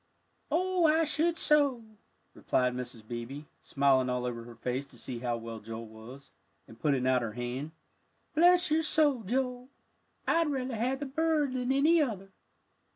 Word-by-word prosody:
"Oh, 360 Hz, +2 st, +2 dB
I 320 Hz, +1 st, +4 dB
should 320 Hz, +2 st, +1 dB
so," 285 Hz, -7 st, +3 dB, 0.5 s
replied 125 Hz, 0 st, 0 dB
Mrs. 120 Hz, -3 st, -7 dB
Beebe, 120 Hz, +4 st, -6 dB, 0.2 s
smiling 135 Hz, -2 st, +2 dB
all 125 Hz, 0 st, -1 dB
over 115 Hz, -1 st, -4 dB
her 120 Hz, -1 st, -11 dB
face 125 Hz, +3 st, -3 dB
to -, -, -16 dB
see 125 Hz, -3 st, -6 dB
how 120 Hz, -1 st, -2 dB
well 115 Hz, -1 st, -7 dB
Joel 115 Hz, +2 st, -7 dB
was, 110 Hz, +5 st, -13 dB, 0.4 s
and 115 Hz, -, -15 dB
putting 140 Hz, -4 st, +1 dB
out 130 Hz, -1 st, +3 dB
her 115 Hz, -2 st, -4 dB
hand. 125 Hz, +5 st, -4 dB, 0.6 s
"Bless 350 Hz, +1 st, +5 dB
your 315 Hz, +1 st, +3 dB
heart, 290 Hz, -8 st, +2 dB
Joel, 250 Hz, +1 st, -2 dB, 0.6 s
I'd 330 Hz, -1 st, +2 dB
rather 260 Hz, -3 st, -2 dB
have 255 Hz, +5 st, -1 dB
the -, -, -2 dB
bird 300 Hz, -1 st, 0 dB
than 250 Hz, 0 st, -1 dB
any 310 Hz, +5 st, +4 dB
other." 195 Hz, -8 st, -3 dB
210 Hz, 160 wpm, -30 LUFS, -, 0.6 s, Bless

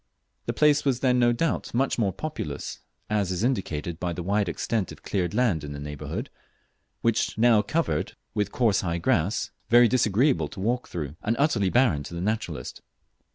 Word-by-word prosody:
The -, -, 0 dB
place 150 Hz, -1 st, +4 dB
was 130 Hz, -3 st, 0 dB
then 125 Hz, -2 st, +3 dB
no 120 Hz, -1 st, +4 dB
doubt 130 Hz, 0 st, -1 dB
much 130 Hz, 0 st, +1 dB
more 100 Hz, -4 st, +2 dB
populous, 95 Hz, -, -5 dB, 0.3 s
as 105 Hz, -3 st, 0 dB
is 90 Hz, +3 st, -2 dB
indicated 85 Hz, -, -1 dB
by 90 Hz, -1 st, -2 dB
the 85 Hz, -, -5 dB
wide 100 Hz, +1 st, +1 dB
extent 100 Hz, +3 st, -2 dB
of -, -, -12 dB
cleared 90 Hz, -1 st, -1 dB
land 105 Hz, -11 st, +2 dB
in 75 Hz, 0 st, -6 dB
the 70 Hz, -, -7 dB
neighbourhood, 75 Hz, 0 st, -5 dB, 1.1 s
now 115 Hz, -1 st, +5 dB
covered 105 Hz, -, -1 dB, 0.2 s
with 105 Hz, -1 st, -1 dB
coarse 115 Hz, -5 st, +2 dB
high 85 Hz, -2 st, -1 dB
grass, 85 Hz, +4 st, 0 dB, 0.2 s
very 120 Hz, +1 st, +7 dB
disagreeable 110 Hz, -, +2 dB
to 95 Hz, -, -10 dB
walk 120 Hz, +5 st, -1 dB
through, 75 Hz, -3 st, -5 dB
and 115 Hz, -, 0 dB
utterly 120 Hz, -10 st, +2 dB
barren 115 Hz, -, +3 dB
to 80 Hz, +4 st, -8 dB
the -, -, -4 dB
naturalist. 110 Hz, +4 st, -3 dB
105 Hz, 175 wpm, -26 LUFS, 85-120 Hz, 1.1 s, very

